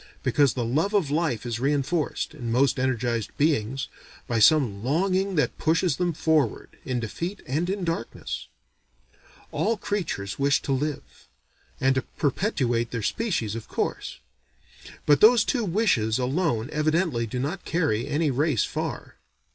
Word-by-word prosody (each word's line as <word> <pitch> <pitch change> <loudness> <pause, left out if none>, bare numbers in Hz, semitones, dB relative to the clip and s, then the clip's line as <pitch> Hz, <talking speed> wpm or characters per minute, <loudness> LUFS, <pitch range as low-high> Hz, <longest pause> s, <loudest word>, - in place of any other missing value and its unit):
Because 140 -3 +3
the 120 -2 -1
love 160 - 0
of 170 -9 +2
life 150 -8 0
is 120 -1 -3
reenforced, 145 +3 0
in 120 -2 -5
most 135 +3 +2
energized 120 -3 0
beings, 135 -4 +1 0.4
by 115 -1 0
some 110 -5 +4
longing 185 +7 +1
that 150 - 0
pushes 165 -1 +2
them 175 -1 +1
forward, 155 -6 0
in 125 -2 -2
defeat 170 - -5
and 155 +7 -1
in 195 -1 -2
darkness. 165 -8 -4 1.0
All 225 +2 0
creatures 175 - -3
wish 140 0 +3
to - - -2
live, 130 - -3 0.5
and 135 0 +3
to 130 - 0 0.2
perpetuate 130 - 0
their 115 -3 -4
species, 170 - -1
of 115 -1 -6
course; - - -3 0.9
but 145 -1 +4
those 225 0 +7
two 245 -4 0
wishes 165 - +2
alone 130 -2 0
evidently 155 -5 +1
do 120 - -5
not 150 +9 -3
carry 145 -9 0
any 150 0 +1
race 140 -2 +1
far. - - -4
145 Hz, 145 wpm, -25 LUFS, 120-170 Hz, 1.0 s, those